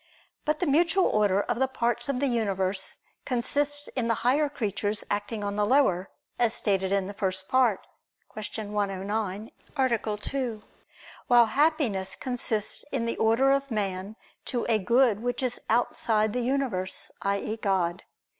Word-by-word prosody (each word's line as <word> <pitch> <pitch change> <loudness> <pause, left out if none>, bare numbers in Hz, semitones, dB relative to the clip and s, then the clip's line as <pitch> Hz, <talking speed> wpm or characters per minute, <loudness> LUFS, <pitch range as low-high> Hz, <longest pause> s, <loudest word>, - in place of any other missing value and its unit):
But 305 0 +1
the 360 - -1
mutual 340 +5 +3
order 205 -2 +3
of - - -2
the 265 - +3
parts 240 -1 -1
of 265 -3 0
the 280 - +1
universe 195 -6 +1 0.3
consists 290 +3 0
in 245 -3 -2
the 230 0 -1
higher 285 +4 +3
creatures 210 -5 -2
acting 205 +1 -2
on 200 0 -3
the 210 - +2
lower, 205 -6 +3 0.3
as 235 -2 +2
stated 195 -2 0
in 200 -1 +1
the 200 - -6
First 190 -1 -1
Part 250 -6 +2 0.5
(Q. 215 0 -6
109, 205 +1 -2 0.3
A. 235 -5 +1
2): 235 -1 -3 0.6
while 240 -2 +7
happiness 225 - +1
consists 235 -4 -2
in 255 -4 -1
the 230 - -2
order 230 +5 +3
of 275 0 +1
man 200 -2 -2 0.3
to 240 -2 -2
a 225 -2 +3
good 235 +2 +3
which 245 +2 -2
is 250 -1 -2
outside 220 -2 +1
the 250 - 0
universe, 240 -8 -1
i.e. 200 +2 -1
God. 190 -4 0
225 Hz, 155 wpm, -27 LUFS, 200-255 Hz, 0.6 s, while